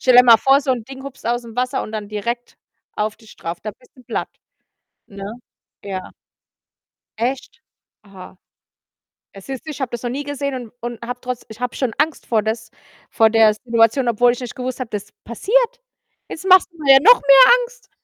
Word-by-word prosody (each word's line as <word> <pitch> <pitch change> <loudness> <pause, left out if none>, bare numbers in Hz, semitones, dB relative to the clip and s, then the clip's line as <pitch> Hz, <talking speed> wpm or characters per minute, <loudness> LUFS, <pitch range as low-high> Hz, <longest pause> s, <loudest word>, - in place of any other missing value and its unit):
Stell 255 -1 +4
dir 250 - +10
mal 235 -2 +8
vor, 270 +1 +4
so 270 - -2
'n 235 -3 -4
Ding 265 +1 -10
hupst 275 -3 -10
ausm 235 -1 -3
Wasser 255 +2 -1
und - - -8
dann 210 -2 -5
direkt 235 +3 -5 0.4
auf 210 0 -2
dich 220 -2 -17
drauf. 170 +1 -6
Da 215 -1 -6
bist 250 +4 -26
du 255 - -17
platt, - - -3 0.8
ne? 200 -1 -10 0.6
Ja. 190 -2 -6 1.1
Echt? 255 +3 -3 0.4
Aha. 190 -2 -13 1.0
Ah, 195 - -10
siehst 265 +7 -8
du, - - -7
ich 280 - -8
habe 255 - -3
das 240 0 -6
noch 240 - -2
nie 280 +4 -4
gesehen 280 -1 -4
und 245 -4 -8
und 240 -1 -6
habe 245 0 -5
trotz 250 -1 -5
ich 220 +2 -12
habe 250 -1 -3
schon 255 -4 -2
Angst 310 +1 0
vor 225 -2 +1
dass 220 +1 -4 0.4
vor 225 -1 +4
der 220 -1 +5
Situation, 230 +3 +1
obwohl 240 +1 +3
ich 245 - -5
nicht 250 -2 -7
gewusst 255 0 -5
habe, 255 - -5
dass 205 -2 -5
das - - -26
passiert. 485 - 0 0.5
Jetzt 360 - -8
machst 370 -1 +6
du 335 - -22
mir 275 -1 +7
ja 270 - +8
noch 485 +8 +8
mehr 275 - +8
Angst. - - -13
245 Hz, 205 wpm, -20 LUFS, 220-270 Hz, 1.1 s, dir